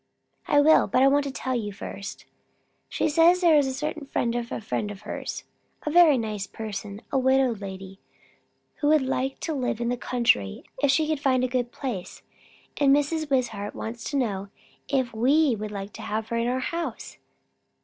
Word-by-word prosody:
"I 290 - +4
will; 315 +2 +5
but 255 - +3
I - - +7
want 285 +1 +3
to 280 - -3
tell 260 0 -3
you 220 -4 -2
first. 200 0 -8 0.6
She - - 0
says 330 +4 +5
there 335 -3 +5
is 290 -2 +4
a - - -1
certain 300 0 -4
friend 235 -3 -1
of 240 -1 -3
a - - -3
friend 210 -1 -3
of 205 -1 -9
hers 210 - -5 0.4
a 300 - -1
very 330 -4 +6
nice 215 -4 -3
person, 210 0 -7
a 270 - +2
widow 260 -1 +3
lady, 195 -2 -8 0.8
who 290 - 0
would 305 -2 +4
like 265 0 -2
to 320 - -2
live 250 -5 -2
in 235 0 -1
the 245 - -1
country 235 - +1 0.2
if 285 - +3
she 305 +3 +3
could 310 -2 0
find 260 -3 +2
a - - +2
good 245 -1 -1
place; 235 -10 -6 0.5
and 280 -2 +4
Mrs. 300 +1 -1
Wishart 230 -7 -1
wants 230 +1 -6
to 285 - -1
know, 200 -6 -1 0.4
if 260 -4 0
we 265 +4 +3
would 215 0 -5
like 200 0 -6
to - - -9
have 220 +1 -3
her 235 - -1
in 230 +1 0
our 255 +1 0
house." 335 +5 -4
255 Hz, 200 wpm, -26 LUFS, 215-285 Hz, 0.8 s, I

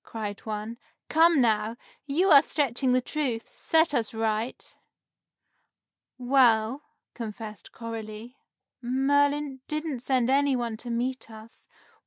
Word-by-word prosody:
cried 210 -3 -6
one. 215 +2 -5 0.3
"Come, 325 0 +5
now! 225 0 +1 0.3
You 340 +7 +2
are 280 -2 +10
stretching 270 -4 0
the 255 0 +3
truth! 250 -5 -3
Set 320 -1 +2
us 235 -2 -1
right!" 220 +2 -3 1.4
"Well," 245 -1 +3 0.3
confessed 220 -2 -8
Coralie, 225 +1 -8 0.5
"Merlin 285 +2 +1
didn't 305 -3 -3
send 255 0 +1
any 280 0 +3
one 235 -2 -2
to 240 - -9
meet 245 +2 -3
us. 220 +1 -14
245 Hz, 115 wpm, -27 LUFS, 225-280 Hz, 1.4 s, are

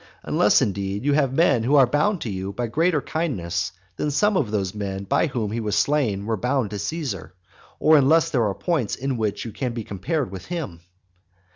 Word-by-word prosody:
Unless, - - +3
indeed, 100 +3 -2
you 145 - +3
have 140 -3 +2
men 140 -4 +3
who 130 +6 +2
are 135 -2 +7
bound 155 - +1
to 115 - -3
you 95 0 -4
by 120 +4 -2
greater 150 +6 +1
kindnesses 95 - -2 0.3
than 150 - -1
some 205 +8 +2
of 140 - +1
those 100 -3 -1
men 100 -2 -4
by 100 - +1
whom 115 -7 -3
he 115 - -2
was 105 -3 -1
slain 120 -10 +1
were 110 0 0
bound 125 -1 0
to 105 - -4
Caesar, 100 - -4 0.4
or 155 0 +6
unless 160 +4 +4
there 120 -6 +2
are 100 - -2
points 155 - -1
in 135 +1 -2
which 110 -2 -2
you 115 - -5
can 125 +2 -3
be 115 -1 -4
compared 130 - -2
with 95 -2 -8
him. 160 - -5
120 Hz, 210 wpm, -23 LUFS, 100-150 Hz, 0.4 s, are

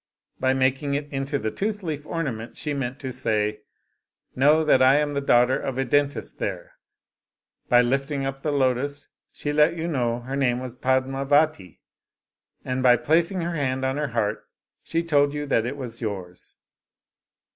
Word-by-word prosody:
By 130 0 +2
making 135 +2 +1
it 145 +1 -3
into 135 +1 -2
the 110 -4 -3
tooth 205 - -3
leaf 150 -3 -4
ornament 125 -9 -4
she 150 - -3
meant 135 -2 -3
to 130 -2 -4
say, 105 -4 -1 0.4
' - - -49
Know 150 +4 +4
that 150 -4 +4
I 130 +1 +6
am 150 0 +1
the 140 - -1
daughter 125 -1 +3
of 130 -2 -4
a 135 - 0
dentist 145 +3 0
there/ - - -4 1.0
By 120 0 +6
lifting 135 +2 -1
up 135 0 -4
the 150 - -1
lotus 140 +1 0 0.2
she 145 - -3
let 150 +3 +4
you 165 0 -3
know 120 -6 -1
her 130 +3 -5
name 125 -3 +1
was 125 -1 -7
Padmavati; 135 - +1 0.8
and 130 0 -2
by 125 -1 +6
placing 170 +8 +1
her 170 +1 -2
hand 130 -4 -1
on 130 +1 -1
her 150 0 -1
heart 110 -3 -2 0.3
she 165 +1 -2
told 145 -3 +2
you 145 0 -3
that 120 -5 +1
it 135 +3 -4
was 120 -4 -7
yours. 95 -5 -6
135 Hz, 175 wpm, -24 LUFS, 125-145 Hz, 1.0 s, I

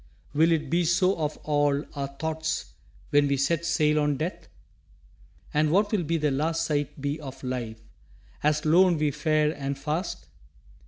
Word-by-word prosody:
Will 160 +3 +4
it 155 -2 +1
be 175 +1 +3
so 185 +3 +3
of 150 -2 -2
all 145 -1 +1
our 140 -1 -2
thoughts 155 - -3 0.4
When 145 0 +4
we 140 0 +1
set 155 +5 +1
sail 155 -2 +2
on 145 -1 +1
Death? 160 +6 -4 1.1
And 150 +1 +3
what 205 +6 +2
will 205 -5 +1
the 155 -2 0
last 165 +4 0
sight 145 -3 -2
be 145 +2 -2
of 135 -3 -9
life 120 -3 -4 0.6
As 150 +1 +1
lone 175 +2 +5
we 150 -1 +1
fare 155 +1 +1
and 140 -2 -4
fast? 150 +6 -3
150 Hz, 160 wpm, -26 LUFS, 145-165 Hz, 1.1 s, lone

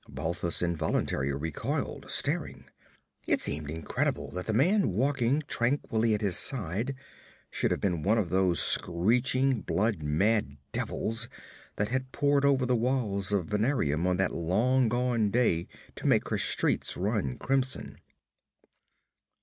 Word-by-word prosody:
Balthus 85 +2 -2
involuntarily 80 -5 -1
recoiled, 70 +2 -4
staring. - - -1 0.6
It - - +2
seemed 75 0 -1
incredible 80 0 -3
that 90 0 -6
the - - 0
man 180 - +2
walking 135 +4 0
tranquilly 115 -4 +1
at 105 - -5
his 100 -4 +3
side 115 - +4 0.6
should - - 0
have - - -1
been 90 -5 -1
one 105 +7 +2
of 95 -7 -1
those 95 -2 +2
screeching, 125 +7 +2
blood 105 -3 -1
mad 75 +1 0
devils 115 +1 -2 0.5
that 105 +1 -2
had 130 +1 -3
poured 140 -1 +1
over 135 -2 +3
the 125 0 +1
walls 110 -6 0
of 100 -4 0
Venarium 105 - 0
on 90 0 +1
that 95 0 0
long 115 +9 +1
gone 120 -3 0
day 100 -7 +1 0.3
to - - -5
make - - +2
her - - 0
streets - - +1
run 95 - -2
crimson. 135 -1 -2
110 Hz, 135 wpm, -28 LUFS, 85-125 Hz, 0.6 s, side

